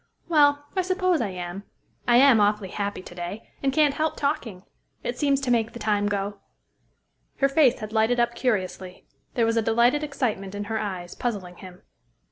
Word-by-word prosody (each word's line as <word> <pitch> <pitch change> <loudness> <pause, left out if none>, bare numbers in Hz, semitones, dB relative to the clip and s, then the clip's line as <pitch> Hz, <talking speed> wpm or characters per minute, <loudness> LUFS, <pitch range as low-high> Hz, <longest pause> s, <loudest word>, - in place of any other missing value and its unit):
Well, 290 -3 +4
I 375 - +2
suppose 370 -3 +1
I 215 - -1
am. 180 +1 -6 0.5
I 240 - +5
am 260 -3 +7
awfully 205 -1 +1
happy 200 -1 -4
to - - -11
day, 175 +5 -7
and 275 - +1
can't 295 0 +3
help 310 +2 -1
talking. 260 -10 -2 0.4
It 240 - -3
seems 280 -2 +2
to 260 -2 -1
make 225 -2 +1
the - - -7
time 205 -3 0
go." 200 0 -2 1.0
Her 275 - +3
face 275 -3 +4
had 215 0 -6
lighted 225 +2 +2
up 235 0 +2
curiously. 190 -6 -2 0.3
There 235 - +3
was 230 0 +1
a - - +4
delighted 235 +6 +2
excitement 220 -9 -2
in 205 - -3
her 220 +1 -3
eyes, 185 -4 -5
puzzling 195 -7 -4
him. 185 -1 -12
225 Hz, 185 wpm, -25 LUFS, 200-275 Hz, 1.0 s, am